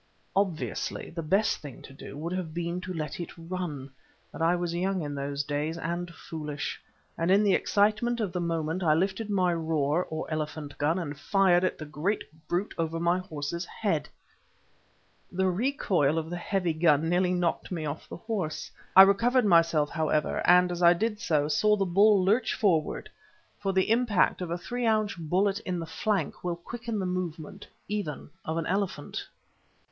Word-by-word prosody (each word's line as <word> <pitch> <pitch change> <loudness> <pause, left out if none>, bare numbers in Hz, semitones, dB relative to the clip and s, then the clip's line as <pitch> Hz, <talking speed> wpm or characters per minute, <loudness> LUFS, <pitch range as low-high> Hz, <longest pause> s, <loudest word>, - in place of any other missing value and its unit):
Obviously 155 - -1
the 165 - -4
best 195 +7 +2
thing 140 -5 -10
to 135 - -12
do 135 - -10
would 165 +4 -4
have 175 -4 -4
been 175 +1 -2
to 185 0 -6
let 165 +2 -4
it 170 - -4
run, 165 -6 -5 0.4
but - - -8
I 165 +2 +4
was 175 -1 -2
young 185 0 0
in 145 -1 -4
those 140 0 -2
days 150 +3 -2
and 175 +2 -3
foolish, 150 -3 -5 0.4
and 165 +1 +1
in 200 +3 +5
the 200 -2 +4
excitement 215 +6 +2
of 210 -5 -1
the 180 - -1
moment 165 +1 -1
I 155 -4 +4
lifted 195 +5 -1
my 185 -3 +2
"roer" 160 0 0
or 160 0 -4
elephant 155 -1 -4
gun 155 +4 +2
and 155 -5 -4
fired 185 +3 +3
at 185 - 0
the 155 - -7
great 155 +8 -1 0.2
brute 180 +4 -1
over 165 0 -1
my 170 +2 +2
horse's 165 -1 -4
head. 185 -5 -2 1.2
The 190 +1 +1
recoil 180 - +1
of 160 +1 -3
the - - -2
heavy 180 -1 -1
gun 155 -1 +3
nearly 180 +1 +2
knocked 175 +1 -1
me 165 -4 -3
off 150 +1 -5
the - - -7
horse. 185 -5 -4 0.2
I 190 - +12
recovered 230 +5 +3
myself, 165 -5 +4
however, 155 -2 0
and, 180 0 +6
as 175 0 -4
I 170 0 +7
did 210 +4 -1
so, 150 -6 +1
saw 210 +8 +3
the 195 -2 0
bull 195 +1 +4
lurch 220 +6 +2
forward, 165 -8 +1 0.5
for 195 -1 -1
the 190 +2 +1
impact 225 -6 +2
of 180 - -3
a 170 - -1
three 240 +7 -3
ounce 215 -2 +2
bullet 185 +4 0
in 180 -1 -3
the 165 - -4
flank 185 +1 -2
will 175 -1 -1
quicken 230 +6 -5
the 190 - -1
movement 180 0 -4 0.2
even 200 -9 -4
of 160 +1 -3
an 165 - -1
elephant. 190 -6 -2
175 Hz, 185 wpm, -28 LUFS, 155-195 Hz, 1.2 s, I